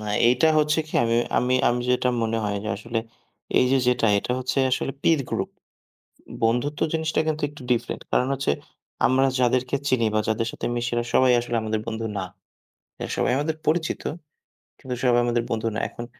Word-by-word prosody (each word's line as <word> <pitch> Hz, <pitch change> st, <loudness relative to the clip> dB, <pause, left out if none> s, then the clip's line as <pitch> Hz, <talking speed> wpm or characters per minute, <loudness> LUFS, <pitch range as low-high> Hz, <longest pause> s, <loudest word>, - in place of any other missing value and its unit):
না, 105 Hz, -, -7 dB, 0.2 s
এইটা 125 Hz, +5 st, +4 dB
হচ্ছে 150 Hz, +1 st, +2 dB
কি -, -, -12 dB
আমি 115 Hz, 0 st, +1 dB, 0.2 s
আমি 125 Hz, +1 st, +1 dB
আমি 120 Hz, +1 st, 0 dB
যেটা 125 Hz, 0 st, +2 dB
মনে 115 Hz, 0 st, 0 dB
হয় 100 Hz, -1 st, -1 dB
যে -, -, -3 dB
আসলে 115 Hz, +2 st, -3 dB, 0.6 s
এইযে 130 Hz, +2 st, +4 dB
যেটা 125 Hz, -2 st, +2 dB
এটা 125 Hz, -, -2 dB
হচ্ছে 130 Hz, +2 st, -1 dB
আসলে 135 Hz, +1 st, -1 dB
পির 160 Hz, -4 st, +4 dB
গ্রুপ। -, -, -2 dB, 0.9 s
বন্ধুত্ব 125 Hz, +6 st, +1 dB
জিনিসটা 160 Hz, -1 st, 0 dB
কিন্তু 155 Hz, -1 st, -1 dB
একটু 145 Hz, 0 st, -13 dB
ডিফারেন্ট। 120 Hz, -, -1 dB
কারণ 125 Hz, -, +2 dB
হচ্ছে 135 Hz, -, 0 dB, 0.6 s
আমরা 130 Hz, +1 st, +3 dB
যাদেরকে 125 Hz, +1 st, +2 dB
চিনি 125 Hz, -4 st, +2 dB
বা 110 Hz, -, +3 dB
যাদের 115 Hz, +1 st, 0 dB
সাথে -, -, -6 dB
মিশি 120 Hz, +1 st, -2 dB
এরা 120 Hz, -, +1 dB
সবাই 130 Hz, -1 st, +5 dB
আসলে 120 Hz, 0 st, -3 dB
আমাদের 110 Hz, 0 st, -1 dB
বন্ধু 115 Hz, 0 st, -3 dB
না। 95 Hz, -, -1 dB, 0.8 s
এরা -, -, -4 dB
সবাই -, -, +2 dB
আমাদের 155 Hz, +2 st, -1 dB
পরিচিত, 160 Hz, +1 st, +1 dB, 0.8 s
কিন্তু 130 Hz, -3 st, -5 dB
সবাই 120 Hz, -1 st, +4 dB
আমাদের 120 Hz, 0 st, +1 dB
বন্ধু 115 Hz, 0 st, -1 dB
না। -, -, -1 dB
এখন 120 Hz, -, -8 dB
125 Hz, 180 wpm, -24 LUFS, 115-135 Hz, 0.9 s, সবাই